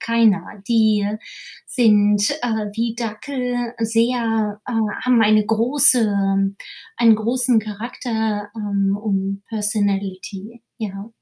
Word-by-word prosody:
keiner. 230 -4 +2 0.2
Die 220 -3 +2 0.6
sind, 210 -3 +3
äh, 220 -3 -1
wie 230 0 -2
Dackel 245 +1 -4
sehr 225 -2 0
äh, - - -5 0.3
haben 250 -2 +4
eine 215 -1 +3
große 240 0 +4 0.8
einen 230 -2 +5
großen 240 +1 +1
Charakter, 215 -1 -4
ähm, 200 -2 -1
und 195 -1 -2
Personality, 205 0 -3 0.2
ja. 200 -1 -6
220 Hz, 95 wpm, -20 LUFS, 205-235 Hz, 0.8 s, einen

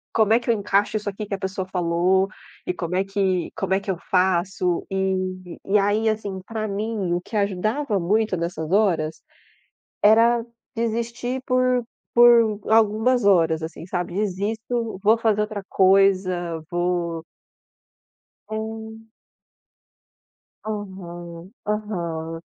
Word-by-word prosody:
Como 220 -1 +4
é 235 - +5
que 240 - -7
eu - - +6
encaixo 205 0 +1
isso 210 -1 -3
aqui 205 +2 -6
que 205 - -6
a - - 0
pessoa 190 0 -3
falou 180 +1 +2 0.4
e 180 - 0
como 180 0 -4
é 190 - +2
que 195 -3 0
como 190 -1 -1
é 190 - +3
que 200 0 -9
eu 185 - 0
faço? 180 0 0
E 185 -2 -2
e 205 +2 +3
aí, 210 +3 +2
assim, 205 -3 -3
para 220 -1 -3
mim 205 -2 -2
o 175 - 0
que 215 +4 -5
ajudava 210 +5 0
muito 210 +3 +1
nessas 170 -2 -3
horas, 170 -7 +1 0.8
era 230 +2 +5 0.3
desistir 235 +2 -2
por 255 -1 +2 0.3
por 235 -3 +6
algumas 220 +2 +3
horas, 165 -5 +3
assim, 160 0 -7
sabe. 180 -1 -3
Desisto, 215 +3 -2
vou 220 +2 +4
fazer 220 -2 +1
outra 210 -1 -3
coisa, 185 -3 +3
vou 175 -2 -1 1.3
É. 220 0 -5 1.6
Uhum, 180 -4 -7 0.2
uhum. 170 -6 -3
195 Hz, 130 wpm, -23 LUFS, 180-220 Hz, 1.6 s, eu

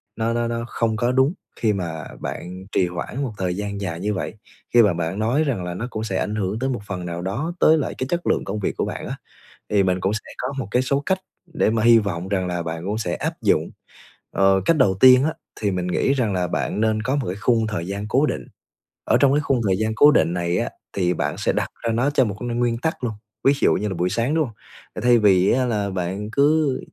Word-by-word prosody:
nó 115 +1 0
nó 120 0 0
nó 115 0 -3
không 115 -2 -1
có 120 +3 +1
đúng 135 +5 +3 0.3
khi 110 -2 +2
mà 80 -4 -4 0.2
bạn 90 +1 -6
trì 90 - +2
hoãn 90 +10 -4
một 120 -5 -3
thời 90 -1 -1
gian 100 -1 -4
dài 85 -3 -3
như 105 +3 -1
vậy. 95 - -3 0.4
Khi 120 - +8
mà 100 -4 +3
bạn 85 +4 -3
nói 125 +8 +2
rằng 125 -11 -1
là 90 0 -4
nó 115 +7 -4
cũng 110 - -4
sẽ 95 -4 -2
ảnh 105 - -2
hưởng 105 +1 -2
tới 135 +1 -1
một 120 -6 -2
phần 90 -3 -4
nào 85 0 -4
đó 130 - -3
tới 160 - +6
lại 150 - -2
cái 130 - -2
chất 175 0 -2
lượng - - +2
công 105 +2 -3
việc 95 - -2
của - - 0
bạn - - -5
á, - - -4 0.5
thì 100 -2 +3
mình 90 0 +1
cũng 95 - +1
sẽ 105 - -6
có 130 +2 -3
một 120 - -3
cái 125 - +3
số 140 +2 0
cách 190 - +2 0.4
để 130 - +2
mà 110 -1 0
hy 115 0 +7
vọng 95 -4 -3
rằng 95 -2 0
là 90 -1 -2
bạn 80 +1 -5
cũng 105 +2 -1
sẽ 90 -6 -2
áp - - -2
dụng. - - +2 0.6
Ờ, 95 -1 +3
cách 165 - +3
đầu 100 -9 +3
tiên 130 0 +8
á 155 +1 0 0.3
thì 100 -2 +1
mình 90 -1 -2
nghĩ 135 +9 +1
rằng 120 -7 0
là 90 -1 0
bạn 105 - -2
nên 110 -1 +1
có 130 +3 0
một 130 - -2
cái 90 - -2
khung 115 -2 +2
thời 95 -5 -3
gian 100 +1 -4
cố 135 +6 +3
định, - - -3 0.6
ở - - +4
trong 140 -1 +4
cái 150 - +3
khung 135 -4 +1
thời 95 - +2
gian 110 0 0
cố 150 +1 +7
định 85 - +3
này 85 0 0
á - - -1 0.2
thì 90 -2 +1
bạn - - -2
sẽ - - 0
đặt - - -1
ra 115 - 0
nó 125 +5 +2
cho 130 -3 +3
một 100 -3 -3
cái 120 - -3
nguyên 120 0 0
tắc 145 +2 -3
luôn, 115 - -1 0.3
ví 135 - +5
dụ - - +4
như 105 - -1
là 95 - -3
buổi 90 +2 0
sáng, 120 +8 0
đúng 155 -2 +2
không? 110 - -13 0.5
Thay 120 -1 +6
vì 95 -3 +4
á 130 0 +2
là 105 -4 -1
bạn 95 +3 -3
cứ 145 0 +2
110 Hz, 265 wpm, -22 LUFS, 95-125 Hz, 0.6 s, Khi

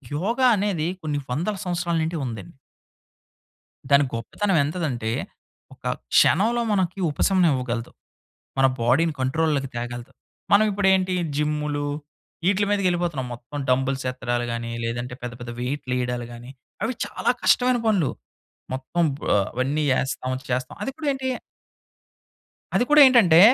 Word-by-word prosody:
యోగ 205 - -1 0.2
అనేది 195 -6 0 0.2
కొన్ని 150 -2 -1
వందల 175 +11 -1
సంవత్సరాల 175 -1 -1
నుండి 165 +1 -2
ఉందండి. 120 +6 -7 1.3
దాని 140 +1 +7
గొప్పతనం 180 - -1
ఎంతదంటే, 140 -8 -2 0.6
ఒక - - -22 0.3
క్షణంలో 230 +8 +4
మనకి 190 -2 0
ఉపశమనం 180 +3 +3
ఇవ్వగలదు. 120 -2 -3 0.7
మన 135 - +5 0.2
బాడీ‌ని 140 +8 +3
కంట్రోల్‌లోకి 140 0 0
తేగలదు. 120 0 -5 0.4
మనం 205 +2 +6
ఇప్పుడు 200 -1 +1
ఏంటి 185 -1 +1 0.2
జిమ్ములు, 150 -1 -1 0.6
ఇ‌ట్లీ 205 +1 +2
మీదకి 200 -2 +2
ఎళ్ళిపోతున్నాం 170 -7 -2
మొత్తం 120 +5 -9
డంబుల్స్ 130 +1 +1
ఎత్తడాలు 120 -1 -2
గాని 115 0 -4
లేదంటే 120 +2 -3
పెద్ద 120 -1 -4
పెద్ద 120 0 -6
వెయిట్లు 130 0 -3
వేయడాలు 125 -1 -2
గాని. 120 +2 -10 0.3
అవి 230 +4 0
చాలా - - 0
కష్టమైన 250 0 +4
పనులు. 190 -10 +2 0.6
మొత్తం 135 +6 -1 0.2
బో - - -7 0.3
అవన్నీ 135 +5 -1 0.2
ఏస్తాం 130 -1 -2 0.2
చేస్తాం 125 +1 -2
అది 270 - -2
కూడా 310 -2 -4
ఏంటి. 265 -1 -3 1.5
అది - - +4
కూడా 300 0 +8
ఏంటంటే 210 -11 +6
150 Hz, 130 wpm, -24 LUFS, 125-185 Hz, 1.5 s, కూడా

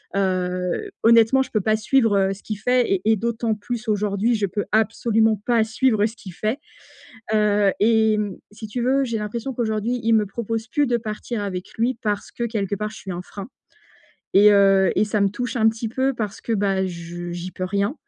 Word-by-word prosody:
heu, 185 - -1
honnêtement 230 +3 +5
je - - -12
peux 215 - +1
pas 215 +2 +2
suivre, 225 -1 +2
heu, 195 0 +2
ce 195 - -14
qu'il 215 -2 -5
fait 250 +2 +2
et 185 - 0
et - - +5
d'autant 230 0 -1
plus 235 +2 -6
aujourd'hui, 210 +2 +1
je 210 -2 0
peux 205 +2 -3
absolument 220 0 +2
pas 235 -2 +3
suivre 220 -1 +1
ce 225 - -4
qu'il 190 -5 -10
fait, 215 - -2 0.7
heu 210 -2 +3
et 220 0 +3
mmh, 205 -3 -3 0.2
si 220 +1 -9
tu 240 +4 -4
veux, 270 +2 +2
j'ai 230 -2 -2
l'impression 225 +5 -4
qu'aujourd'hui 230 +1 -1
il 225 0 +3
me 215 -2 +3
propose 225 +2 -4
plus 290 +5 +1
de 240 - +1
partir 220 0 -5
avec 185 -2 -5
lui. 235 +2 0
Parce 205 -2 -2
que 235 - -5
quelque 210 -4 -2
part, 210 +1 -4
je 220 - -11
suis 190 - -7
un 175 - -4
frein 200 +5 -9 0.9
et 205 +2 +7
heu 195 -2 +5
et - - +4
ça 210 0 -1
me 200 - +4
touche 245 +6 -4
un 220 -1 +4
petit 225 +1 -3
peu 265 +4 0
parce 215 -3 -4
que, 230 - -3
bah, 195 -2 +1
je 175 0 -7
j'y 175 +1 -6
peux 185 - -7
rien 200 +6 -1
215 Hz, 210 wpm, -22 LUFS, 200-230 Hz, 0.9 s, et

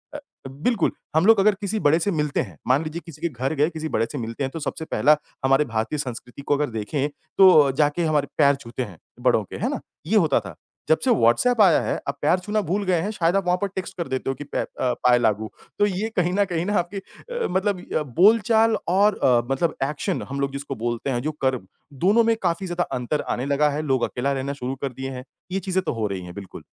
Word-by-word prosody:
अ, - - -4 0.3
बिल्कुल 160 - 0 0.2
हम 160 - +4
लोग 220 -1 +6
अगर 205 +1 +4
किसी 210 +2 -2
बड़े 160 +3 +4
से 200 +4 0
मिलते 150 -4 0
हैं, 95 - -8
मान 135 +5 +3
लीजिए 160 +2 -5
किसी 155 -3 -12
के 170 - 0
घर 130 +2 -3
गए 150 +2 +2
किसी 160 -2 -5
बड़े 115 - +1
से 145 - -5
मिलते 115 +3 -4
हैं, 135 - -1
तो 165 - -6
सबसे 160 +1 -4
पहला 150 0 +3 0.3
हमारे 135 +3 +4
भारतीय 115 +5 -2
संस्कृति 125 0 -6
को 145 - +1
अगर 150 0 -1
देखें 115 +6 -2 0.3
तो 170 -8 +7
जाके 150 +4 +1
हमारे 150 -3 +1
पैर 140 -2 +5
छूते 130 -2 -6
हैं 95 -7 -10 0.2
बड़ों 120 -3 +3
के, - - -10
है - - -1
ना? - - -3 0.3
ये 215 +4 +3
होता 155 -10 +3
था, 100 -6 -10 0.3
जब 160 - +4
से 260 - +4
व्हाट्सऐप 220 - +3
आया 185 -6 +6
है, - - -1
अब 140 - -2
पैर 165 +5 +3
छूना 210 +3 -1
भूल 200 +3 0
गए 180 -2 +2
हैं 205 - -2
शायद 175 -3 +1
वहाँ 180 -2 +2
पर 200 - +1
टेक्स्ट 190 0 -5
कर 170 - -3
देते 130 0 -3
हो - - +1
कि 145 - -7
पै 145 - -3
अ, - - -3 0.4
पाऐ 125 -1 +5
लागू, 110 -2 0 0.3
तो 205 - +5
ये 205 +2 -1
कहीं 180 0 +2
न 200 +1 +3
कहीं 175 -1 -2
ना 205 - -1
आपके 175 +3 -4
अ, 485 - -6
मतलब 190 0 0 0.4
बोलचाल 220 +3 +5
और 200 +3 +3
अ, 120 -2 +4
मतलब 160 +5 0
एक्शन 160 +5 -2
हम 140 - -4
लोग 140 0 0
जिसको 140 0 -5
बोलते 120 +3 -3
हैं, 120 -2 -1
जो 155 +4 -2
कर 130 -1 +2 0.5
दोनों 225 +4 +5
में 230 0 +3
काफ़ी 175 +1 0
ज़्यादा 175 0 -1
अंतर 125 +5 -2
आने 125 - -3
लगा 145 +1 +2
है, 145 +1 -2
लोग 135 -5 0
अकेला 135 +3 -1
रहना 135 +1 -3
शुरू 130 -1 -4
कर 135 -2 -3
दिए 135 +2 -5
हैं, 125 -1 -7 0.3
ये 195 - 0
चीज़ें 190 -1 -1
तो 165 - -2
हो 110 -3 -1
रही 95 -2 -4
हैं, 90 - -9
बिल्कुल। 100 -2 -9
150 Hz, 245 wpm, -23 LUFS, 130-190 Hz, 0.5 s, तो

